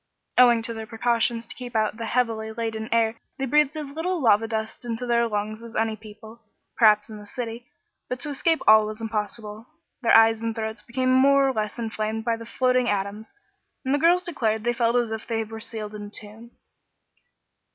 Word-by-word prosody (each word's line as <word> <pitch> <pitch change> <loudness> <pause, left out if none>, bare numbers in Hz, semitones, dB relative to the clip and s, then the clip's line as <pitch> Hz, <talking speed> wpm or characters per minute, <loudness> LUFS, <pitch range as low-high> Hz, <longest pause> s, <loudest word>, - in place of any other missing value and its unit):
Owing 240 -2 +6
to 230 - -3
their 220 -1 -6
wise - - -26
precautions 230 0 0
to - - -9
keep 245 -2 -9
out 215 0 +1
the 230 -1 -4
heavily 225 -2 0
laden 225 -1 -4
air 225 0 +2 0.2
they 270 - -1
breathed 295 +2 +3
as 295 -2 -5
little 340 +4 -2
lava 225 -4 +4
dust 220 +1 -4
into 235 +1 -4
their 235 -1 +2
lungs 215 0 -3
as 235 0 -11
any 220 0 0
people, 220 +2 -13 0.3
perhaps, 210 -2 +5
in 215 -2 -9
the 205 - -12
city; 235 0 -6 0.4
but 250 - -3
to 300 - -3
escape 290 +1 +1
all 215 0 +7
was 215 +1 -6
impossible. 215 0 -4 0.3
Their 230 -2 +6
eyes 225 0 +5
and 230 -1 -2
throats 220 -1 -4
became 255 +3 0
more 275 +1 +5
or - - -1
less 215 -1 -3
inflamed 220 -1 -3
by 230 -1 +1
the 225 0 -10
floating 255 0 +1
atoms, 205 +2 -3 0.5
and 265 - +1
the 290 - +2
girls 350 +3 +4
declared 220 -11 -1
they 240 +1 +1
felt 235 0 +1
as 240 -2 +1
if 220 -1 -5
they 225 -1 -1
were 220 +1 -8
sealed 215 -1 -6
up 210 - -7
in 205 - -7
a - - -10
tomb. 215 +3 -10
225 Hz, 210 wpm, -25 LUFS, 220-245 Hz, 0.5 s, all